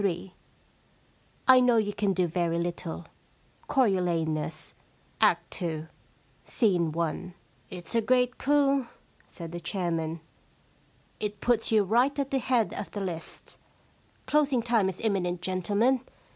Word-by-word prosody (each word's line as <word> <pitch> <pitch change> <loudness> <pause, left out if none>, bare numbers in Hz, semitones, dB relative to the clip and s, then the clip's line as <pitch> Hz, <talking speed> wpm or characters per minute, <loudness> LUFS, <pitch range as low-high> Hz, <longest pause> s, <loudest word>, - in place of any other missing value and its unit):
* - - -3 1.4
I 260 -1 +9
know 245 -2 +4
you 205 -2 +1
can 200 -2 +1
do 185 -1 +2
very 170 0 0
little/ 170 -1 -4 0.6
Coriolanus^ 170 - 0 0.5
Act - - +3
2, 160 -4 -3 0.6
Scene 180 -8 +2
i. 170 +2 -2 0.2
* - - -35
It*s 175 +1 -7
a 230 - +3
great 250 +2 +2
coupy 280 -2 +2 0.4
said 165 -2 -8
the 175 - -5
chairman. 165 -3 -2 0.5
* - - -35
It 210 -1 -3
puts 235 0 +1
you 215 -2 +5
right 240 +8 +2
at 275 -1 -2
the 270 - +2
head 245 -3 +1
of - - -5
the 205 - -5
list. 175 -4 -6 0.7
Closing 285 -5 +2
time 225 -5 +2
is 185 - -7
imminent, 180 -5 -1
gentlemen. 205 +8 +1
195 Hz, 135 wpm, -28 LUFS, 175-245 Hz, 1.4 s, I